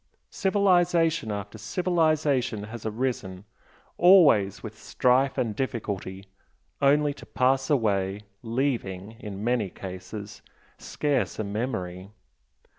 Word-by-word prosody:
Civilisation 175 - +2
after 100 +1 -6
civilisation 150 - 0
has 110 +1 -7
arisen 105 -5 -3 0.5
always 150 - +5
with 110 -1 -7
strife 130 +2 +2
and 110 -4 -1
difficulty, 100 -6 -4 0.6
only 145 +1 +3
to - - -14
pass 135 +1 +1
away, 100 -7 +1 0.2
leaving, 115 -6 -2
in 105 -4 -7
many 120 -4 0
cases, 100 +3 -8 0.4
scarce 145 -4 -1
a 110 - -2
memory. 100 -4 -4
115 Hz, 100 wpm, -26 LUFS, 100-140 Hz, 0.6 s, always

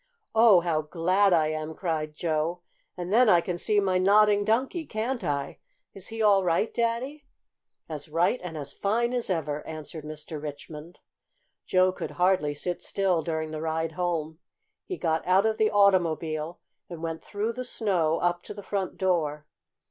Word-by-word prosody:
"Oh, 220 -5 +6
how 165 -3 0
glad 185 +6 +2
I 160 -3 +3
am!" 155 0 -4
cried 155 -4 -3
Joe. 165 +2 -1 0.3
"And 180 +2 -4
then 240 0 +6
I 175 - +6
can 175 0 -3
see 210 +1 +2
my 190 -2 +1
Nodding 205 +2 +5
Donkey, 255 - 0
can't 230 +2 -3
I? 140 -4 -3 0.3
Is 195 -1 -8
he 225 0 -3
all 200 -2 +5
right, 180 +5 +1
Daddy?" 240 +5 -2 0.6
"As 155 -2 -6
right 170 +10 +1
and 165 -3 -6
as 140 -2 -5
fine 235 +4 0
as 245 -4 -1
ever," 150 -4 -1
answered 155 0 -7
Mr. 150 0 -7
Richmond. 150 +2 -9 0.7
Joe 185 0 +4
could - - -6
hardly 180 -5 +2
sit 175 +4 -3
still 190 -4 +1
during 160 -1 -3
the 155 0 -5
ride 160 0 -1
home. 160 -2 -2 0.5
He 370 - -5
got 160 -1 0
out 190 +3 +4
of 220 0 +1
the 215 -1 +3
automobile 170 -5 +2 0.3
and 170 -2 -8
went 165 -1 -4
through 215 +3 -3
the 255 +2 -5
snow 180 -10 0
up 175 0 +1
to - - -9
the 205 - -9
front 195 -2 -3
door. 155 -6 0
175 Hz, 170 wpm, -27 LUFS, 160-205 Hz, 0.7 s, Oh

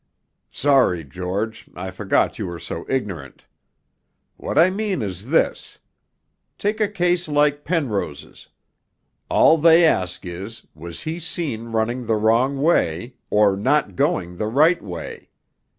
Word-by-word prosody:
'Sorry, 130 - +2
George, 95 +9 -5
I 95 +2 -5
forgot 95 +4 0
you 105 - -3
were 85 -1 -6
so 85 - -7
ignorant. 95 - -4 0.9
What - - -5
I 170 +3 +6
mean 195 - -2
is 95 +2 -6
this. 160 - 0 0.8
Take 215 +2 -1
a 210 - +3
case 180 -3 0
like 145 -1 +1
Penrose's: 110 - -3 0.8
All 160 - +5
they 165 +2 +6
ask 90 - 0
is, 95 +6 -8
was 85 +2 -9
he 160 +2 -4
seen 155 -9 -4
running 115 +2 -2
the 110 - +2
wrong 115 +6 +2
way, 120 - +1 0.2
or 105 -2 +4
not 130 -1 +1
going 90 0 -1
the 105 - -2
right 155 +9 +3
way? 90 -4 -8
115 Hz, 135 wpm, -22 LUFS, 95-155 Hz, 0.9 s, I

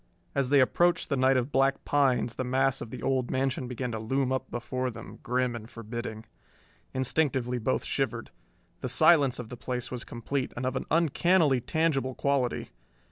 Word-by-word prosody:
As 135 -2 0
they 140 0 +5
approached 175 +6 +2
the 140 - +1
night 130 0 +4
of 130 +3 -1
black 135 0 +2
pines 130 -5 +2
the 130 - -3
mass 135 +1 +1
of 115 - -6
the 125 - -8
old 130 -2 0
mansion 130 -1 -1
began 125 0 -4
to 110 - -3
loom 130 +4 0
up 130 0 -2
before 125 +1 -3
them, 115 - -10
grim 125 0 0
and 115 -1 -8
forbidding. 115 -1 -6 0.7
Instinctively 130 -2 0
both 110 - 0
shivered. - - -2 0.5
The - - -4
silence 145 -7 +5
of 120 -3 -7
the 125 - -7
place 125 0 -4
was 125 -1 -3
complete 130 +3 -3
and 125 - -2
of 130 0 -1
an - - -3
uncannily 165 -3 +3
tangible 135 -4 0
quality. 140 -3 0
130 Hz, 180 wpm, -28 LUFS, 125-135 Hz, 0.7 s, they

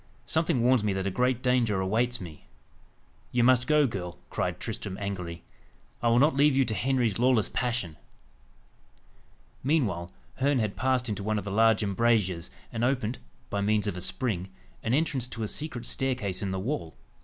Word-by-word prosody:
"Something 160 -7 +1
warns 125 -2 +4
me 105 -2 +1
that 95 0 -2
a 100 - 0
great 125 +3 +1
danger 120 -6 +2
awaits 115 +6 0
me." 80 -8 -10 0.8
"You 120 -1 +2
must 125 0 +4
go, 150 -1 +5
girl," 90 -7 -4
cried - - -2
Tristram 95 -1 -5
angrily. 90 -4 -5 0.6
"I 120 - +1
will 115 0 +4
not 145 +3 +4
leave 140 0 +4
you 135 - +4
to 110 - -2
Henry's 120 -1 +1
lawless 125 -3 +3
passion." 115 -10 -2 1.7
Meanwhile, 105 - 0 0.3
Herne 140 +1 +2
had 105 -4 -1
passed 130 -1 +1
into 105 -2 -3
one 110 +2 0
of 105 - -4
the 100 - -4
large 110 +1 +4
embrasures, 100 -4 +1 0.2
and 115 0 -2
opened, 125 -2 0 0.3
by 100 - 0
means 105 +1 +2
of 100 - -2
a 90 - -5
spring, 95 -2 -1 0.3
an 115 +3 +1
entrance 140 -5 0
to 115 -2 -5
a - - -1
secret 125 -2 -4
staircase 125 -8 -1
in 100 - -2
the 95 0 -2
wall. 105 - -3
115 Hz, 180 wpm, -28 LUFS, 100-130 Hz, 1.7 s, go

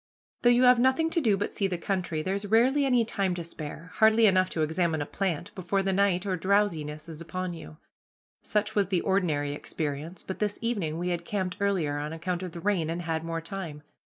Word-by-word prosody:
Though 240 - +5
you 245 +1 +5
have 250 -1 +7
nothing 265 +6 +3
to 335 - +2
do 215 -7 +3
but 205 - -3
see 195 - 0
the 180 -2 -2
country, 175 -4 -2
there's 200 +3 -2
rarely 260 +6 +4
any 245 -3 +3
time 195 -4 0
to 175 - -4
spare, 165 +1 -8
hardly 220 +1 +6
enough 185 -2 +4
to 160 - -1
examine 160 0 0
a 145 - -2
plant, 175 -1 -3
before 190 +1 -1
the 190 0 0
night 195 -1 +2
or 190 -2 0
drowsiness 165 -5 0
is 160 -1 -7
upon 180 +2 -4
you. 75 - -10 0.6
Such 210 0 0
was 205 -3 +2
the 185 -3 +1
ordinary 160 -7 +1
experience, 155 +3 -4
but 190 - -6
this 210 -1 -1
evening 200 -10 -2
we 175 +1 -2
had 175 -1 -2
camped 185 0 -2
earlier 175 -8 0
on 150 +2 -4
account 175 +2 -3
of 180 -3 -6
the 170 - -6
rain, 180 -4 0
and 170 +1 -3
had 160 -1 -2
more 165 0 -3
time. 165 -4 -6
185 Hz, 215 wpm, -28 LUFS, 165-205 Hz, 0.6 s, have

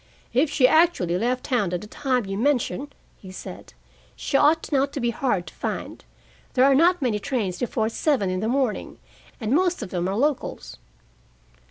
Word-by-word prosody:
"If 275 +5 +3
she 270 -3 +4
actually 315 - +3
left 250 +3 0
town 210 -9 0
at 180 - -2
the - - -8
time 250 +1 -1
you 195 0 -4
mention," 280 +4 0 0.3
he 190 - -11
said, 185 - -10 0.4
"she - - -4
ought 310 +4 +3
not 275 -1 +2
to - - -3
be 240 -2 0
hard 220 -7 -1
to 160 - -11
find. - - -5 0.5
There 255 0 +5
are 275 - +5
not 335 +3 +4
many 220 -5 +1
trains 205 -7 -2
before 225 -2 -1
seven 230 -4 0
in 185 - -1
the 215 - -1
morning, 255 -3 -1 0.4
and 225 0 -1
most 360 +3 +2
of - - -8
them 180 -1 -1
are 190 - -1
locals." 285 +4 -2
250 Hz, 185 wpm, -24 LUFS, 210-285 Hz, 0.5 s, There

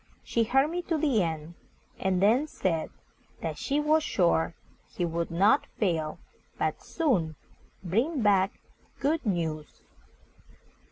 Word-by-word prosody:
She 230 -1 +1
heard 270 +6 +3
me 355 +1 -2
to 325 - +2
the 280 -8 +2
end, 160 -1 -3 0.5
and 190 0 +1
then 245 +9 +4
said 170 - -1 0.5
that - - -3
she 285 +1 0
was 305 +1 +3
sure 170 - +1 0.3
he 175 - -2
would 170 0 -2
not 190 +6 +3
fail, 165 -7 0 0.4
but - - -1
soon 190 - 0 0.5
bring 235 - 0
back 195 -2 +3 0.4
good 310 +3 +1
news. 160 -5 -3
195 Hz, 125 wpm, -28 LUFS, 170-280 Hz, 0.5 s, then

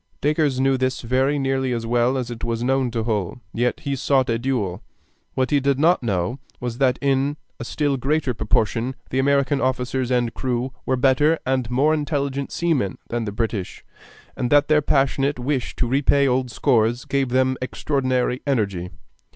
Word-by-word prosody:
Dacres 150 -3 +1
knew 135 0 +3
this 130 0 -1
very 130 +4 +1
nearly 135 -1 0
as 115 -1 -3
well 120 +3 +2
as 125 -2 -3
it 115 - -8
was 115 0 -2
known 130 0 +1
to 115 -1 -2
Hull, 105 -1 -2
yet 120 +1 0
he 140 -1 -2
sought 135 -1 +1
a 115 - 0
duel. 115 -8 -2 0.5
What 130 +1 0
he 145 - +4
did 140 0 +1
not 165 +5 +3
know 110 +2 -1 0.2
was 120 0 -4
that 130 -2 +3
in 140 +1 +1 0.2
a - - -4
still 145 +2 -1
greater 140 0 0
proportion 115 +3 0 0.2
the 130 - 0
American 140 0 +2
officers 130 0 -1
and 120 -2 +1
crew 125 +1 -2 0.2
were 130 - +2
better 135 +5 +3
and 130 -3 0
more 140 +5 +3
intelligent 140 -2 -2
seamen 150 - 0
than 120 -1 -2
the 105 - -3
British, 110 -3 -3 0.5
and 125 - -2
that 145 +2 +4
their 155 -1 +4
passionate 140 0 +1
wish 130 +1 -2
to - - 0
repay 140 +2 +3
old 130 0 +1
scores 120 0 +1
gave 135 -2 0
them 130 +1 +2
extraordinary 130 -1 -1
energy. 100 -9 -1
130 Hz, 175 wpm, -22 LUFS, 120-140 Hz, 0.5 s, he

